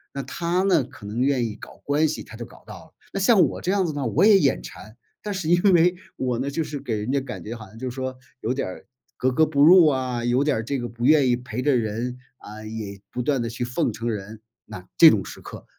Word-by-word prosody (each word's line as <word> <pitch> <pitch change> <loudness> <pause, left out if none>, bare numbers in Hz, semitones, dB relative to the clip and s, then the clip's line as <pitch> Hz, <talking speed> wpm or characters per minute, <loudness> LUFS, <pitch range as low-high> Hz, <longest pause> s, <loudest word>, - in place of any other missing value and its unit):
那 140 - -3
他 170 +7 -1
呢， 180 -7 +3
可 115 -4 -13
能 105 +4 -3
愿 130 -2 +2
意 110 -2 -5
搞 - - -13
关 150 +2 +2
系， 155 - -4
他 - - -12
就 120 - -7
搞 - - -15
到 - - -11
了。 - - -24 0.2
那 - - -2
像 200 +2 +4
我 - - -7
这 185 - -1
样 195 -2 +1
子 160 - -3
呢， 145 -1 -3
我 110 - +3
也 210 -2 +7
眼 - - +1
馋， 110 - -12 0.2
但 210 - -5
是 190 -5 -4
因 175 +1 +3
为 175 +1 +4 0.2
我 125 -2 -2
呢， 135 +2 -2
就 160 +4 -2
是 145 -1 -6
给 115 -4 -3
人 105 +4 -3
家 140 - +2
感 135 - -8
觉 115 +3 -6
好 110 -2 -10
像 110 - -16
就 130 +3 -5
是 - - -7
说， 130 -1 -4 0.2
有 115 - -1
点 135 - -3
儿 95 - -10 0.3
格 130 - +1
格 160 +5 +3
不 145 -2 0
入 175 +2 +8
啊， 130 -4 -1
有 125 +3 +2
点 145 -3 +1
儿 110 - -3
这 135 +4 -3
个 120 - -4
不 120 0 -5
愿 145 -2 +5
意 120 - +3
陪 125 -1 -6
着 145 0 +2
人， 115 +3 -3 0.3
嗯， 110 +1 -9
也 100 -3 -6
不 125 - -3
断 135 +1 0
地 115 - -2
去 120 +1 -5
奉 120 -2 -1
承 115 +2 -4
人。 105 0 -6 0.2
那 90 0 -10
这 165 - +10
种 100 -3 0
时 - - -10
刻， - - -10
130 Hz, 295 characters per minute, -23 LUFS, 115-150 Hz, 0.3 s, 这